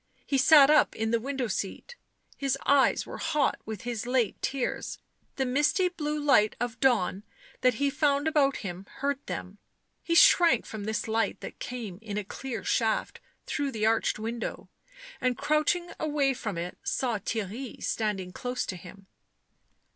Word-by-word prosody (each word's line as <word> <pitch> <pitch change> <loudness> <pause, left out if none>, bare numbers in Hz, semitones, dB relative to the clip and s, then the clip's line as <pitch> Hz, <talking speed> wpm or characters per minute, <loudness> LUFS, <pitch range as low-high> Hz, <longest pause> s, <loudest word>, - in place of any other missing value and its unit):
He 275 - +1
sat 285 +1 +7
up 305 - +4
in 220 0 -1
the 230 - +2
window 265 +1 -2
seat. 215 - -4 0.4
His 275 -1 -1
eyes 280 -1 +4
were - - -8
hot 295 -2 +1
with 220 -3 -5
his 240 -1 -4
late 245 -5 0
tears; 270 -2 -2 0.4
the 265 - 0
misty 295 +8 +2
blue 300 -3 -3
light 275 -8 +4
of 240 -1 -3
dawn 220 -8 +2 0.4
that 255 -2 +3
he 280 +4 +1
found 285 0 +1
about 285 -3 +3
him 185 +1 -6
hurt 280 0 -2
them; 195 +3 -6 0.4
he 335 - -1
shrank 335 -7 +6
from 215 -2 -6
this 220 +1 -2
light 225 +1 0
that - - -8
came 225 -7 -6
in 210 -2 -5
a 210 - -1
clear 240 +4 -6
shaft 225 -2 0 0.3
through 285 -2 -2
the 215 -3 -1
arched 225 0 +2
window, 230 +2 -5 0.5
and, 255 -2 +1
crouching 305 +4 +1
away 290 -3 +1
from 215 -7 -5
it, 175 +1 -5
saw 240 -5 -1
Theirry 220 +4 -4
standing 205 -5 -2
close 250 +6 -3
to 190 - -4
him. 195 +3 -13
250 Hz, 160 wpm, -28 LUFS, 215-280 Hz, 0.5 s, sat